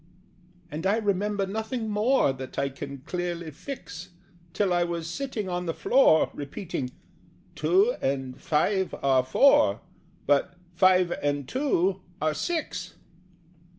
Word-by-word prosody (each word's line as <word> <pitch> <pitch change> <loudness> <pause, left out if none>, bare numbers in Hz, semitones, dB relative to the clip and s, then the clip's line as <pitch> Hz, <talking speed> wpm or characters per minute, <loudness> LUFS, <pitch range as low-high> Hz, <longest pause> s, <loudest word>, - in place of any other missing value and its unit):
And 160 +5 -2
I 205 +3 +3
remember 205 -1 0
nothing 220 +3 -3
more 215 - +2
That 130 0 -9
I 140 - +1
can 135 0 -8
clearly 175 -2 -3
fix, 165 - -8 0.4
Till 190 0 +1
I 175 0 +3
was 170 -1 -3
sitting 220 +2 -4
on 180 -1 -3
the 165 - -2
floor, 245 -12 +4
Repeating 145 -2 -5 0.6
"Two 410 +7 +3
and 135 -1 -2
five 190 +5 +1
are 135 -2 +4
four, 130 - +4 0.4
But 145 +4 +2 0.2
five 185 0 +4
and 145 -2 -1
two 195 - 0 0.2
are 155 0 +1
six." 185 - -3
180 Hz, 125 wpm, -27 LUFS, 145-210 Hz, 0.6 s, floor